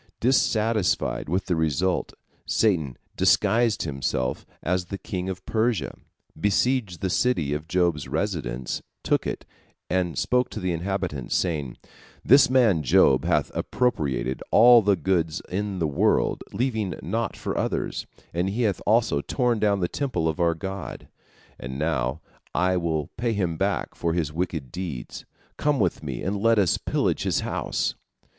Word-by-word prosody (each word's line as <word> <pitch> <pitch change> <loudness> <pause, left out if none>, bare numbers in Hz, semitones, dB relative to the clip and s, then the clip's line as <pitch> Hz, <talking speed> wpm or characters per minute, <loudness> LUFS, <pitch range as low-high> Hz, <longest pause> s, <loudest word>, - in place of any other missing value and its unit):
" - - -56
Dissatisfied 110 - +1
with 90 +4 0
the 90 - 0
result, 80 +3 0 0.3
Satan 80 - +1 0.2
disguised 115 -2 +3
himself 65 -3 -2 0.2
as 90 +1 0
the 100 +3 -5
king 95 -1 -4
of 95 -1 -6
Persia, 110 0 0 0.4
besieged 105 0 +1
the 95 - 0
city 85 - +1
of 75 +2 -4
Job's 85 -5 +1
residence, 65 - -2 0.2
took - - +1
it, - - -4 0.5
and 90 -2 0
spoke 125 0 +1
to - - -6
the 90 -2 -1
inhabitants, 90 -5 -2
saying: 75 -8 -1 0.5
"This 135 +2 +7
man 120 -10 +4
Job 65 -1 +4
hath - - +1
appropriated 65 - -1
all 120 +1 +8
the 100 -1 +3
goods 85 -5 0
in 100 +1 -2
the 85 - 0
world, 70 -3 +1
leaving 110 -7 -1
naught 115 -1 -2
for - - -3
others, - - -2 0.3
and 90 +3 0
he 115 +5 -1
hath 100 -5 0
also 110 -9 +3
torn 120 - 0
down 100 -2 +2
the 90 - +2
temple 130 - -1
of 80 +2 -2
our 85 -1 +2
god, 95 +3 -6 0.5
and 65 +1 -6
now 75 -1 -1 0.3
I 90 0 +2
will 80 -4 -1
pay 115 0 0
him 90 -6 -1
back 100 +4 -1
for 85 -1 -1
his 80 -4 -1
wicked 80 -6 -3
deeds. 85 -8 -6 0.3
Come 145 -1 +1
with 90 -5 +1
me 70 -5 -5
and 100 +1 -2
let 115 +1 +4
us 95 -5 +3
pillage - - 0
his - - 0
house." - - -1
90 Hz, 155 wpm, -25 LUFS, 80-110 Hz, 0.5 s, all